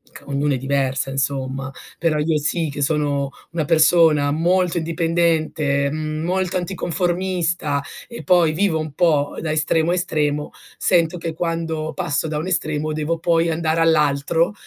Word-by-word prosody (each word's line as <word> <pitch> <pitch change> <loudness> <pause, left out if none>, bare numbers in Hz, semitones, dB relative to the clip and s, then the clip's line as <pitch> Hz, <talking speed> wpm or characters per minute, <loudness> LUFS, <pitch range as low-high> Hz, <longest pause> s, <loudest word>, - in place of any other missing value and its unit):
c - - -9
ognuno 140 +1 0
è - - 0
diversa, 135 0 -1
insomma, 135 0 -2 0.3
però 160 -2 +1
io 155 +1 +1
sì 155 +2 +1
che 145 0 -6
sono 145 -2 0 0.2
una 165 -2 -2
persona 155 -2 +4
molto 175 +3 +1
indipendente, 160 -4 0
mhmm, 155 0 -4
molto 185 +1 -1
anticonformista 175 -4 -1 0.3
e 235 -1 -8
poi 175 -4 +3
vivo 170 -1 +1
un 155 -2 -5
po' 150 -3 +1
da 160 - -2
estremo 160 +2 +1
a - - +2
estremo, 150 -4 -1 0.3
sento 170 -1 +2
che 165 -1 -4
quando 165 -1 -3
passo 160 -3 -1
da 150 - -3
un 155 +4 -3
estremo 155 -4 0
devo 155 +2 -2
poi 170 0 +1
andare 160 0 0
all'altro, 160 +3 +2
160 Hz, 150 wpm, -20 LUFS, 145-170 Hz, 0.3 s, persona